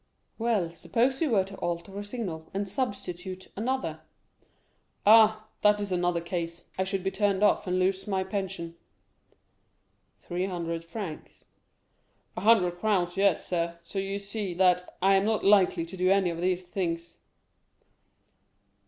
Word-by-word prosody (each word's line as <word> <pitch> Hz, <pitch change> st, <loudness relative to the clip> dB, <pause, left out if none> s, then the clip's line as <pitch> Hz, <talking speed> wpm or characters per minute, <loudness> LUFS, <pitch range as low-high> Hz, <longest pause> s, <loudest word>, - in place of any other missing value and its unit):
"Well, 220 Hz, -7 st, +1 dB
suppose 240 Hz, -, 0 dB
you 320 Hz, -, +2 dB
were 205 Hz, -5 st, +3 dB
to 195 Hz, +1 st, -10 dB
alter 175 Hz, +3 st, -3 dB
a -, -, -4 dB
signal, 200 Hz, -8 st, -5 dB
and 200 Hz, +1 st, -1 dB
substitute 190 Hz, -4 st, -4 dB
another?" 260 Hz, +5 st, -2 dB, 1.1 s
"Ah, 215 Hz, 0 st, +6 dB, 0.2 s
that 210 Hz, 0 st, +4 dB
is 205 Hz, -1 st, -4 dB
another 175 Hz, -1 st, +1 dB
case; 170 Hz, -1 st, -5 dB
I 190 Hz, -, 0 dB
should 190 Hz, -1 st, -2 dB
be 190 Hz, -, 0 dB
turned 205 Hz, -1 st, +1 dB
off, 205 Hz, -, +3 dB
and 180 Hz, 0 st, +1 dB
lose 190 Hz, +2 st, 0 dB
my 190 Hz, -2 st, 0 dB
pension." 190 Hz, -3 st, -4 dB, 1.4 s
"Three 180 Hz, +2 st, -3 dB
hundred 170 Hz, -2 st, -3 dB
francs?" 170 Hz, -2 st, -8 dB, 0.9 s
"A -, -, -4 dB
hundred 185 Hz, -5 st, +4 dB
crowns, 180 Hz, -5 st, +1 dB
yes, 195 Hz, -3 st, +2 dB
sir; 170 Hz, -1 st, -2 dB
so 195 Hz, +3 st, -5 dB
you 195 Hz, +1 st, -2 dB
see 200 Hz, -2 st, -5 dB
that 180 Hz, 0 st, +2 dB
I 195 Hz, +1 st, +6 dB
am 195 Hz, +1 st, +3 dB
not 220 Hz, 0 st, 0 dB
likely 195 Hz, -4 st, +4 dB
to 170 Hz, -, -9 dB
do 185 Hz, 0 st, +1 dB
any 195 Hz, -2 st, +3 dB
of 170 Hz, 0 st, -5 dB
these 185 Hz, 0 st, 0 dB
things." 170 Hz, -2 st, -4 dB
190 Hz, 150 wpm, -28 LUFS, 175-205 Hz, 1.4 s, Ah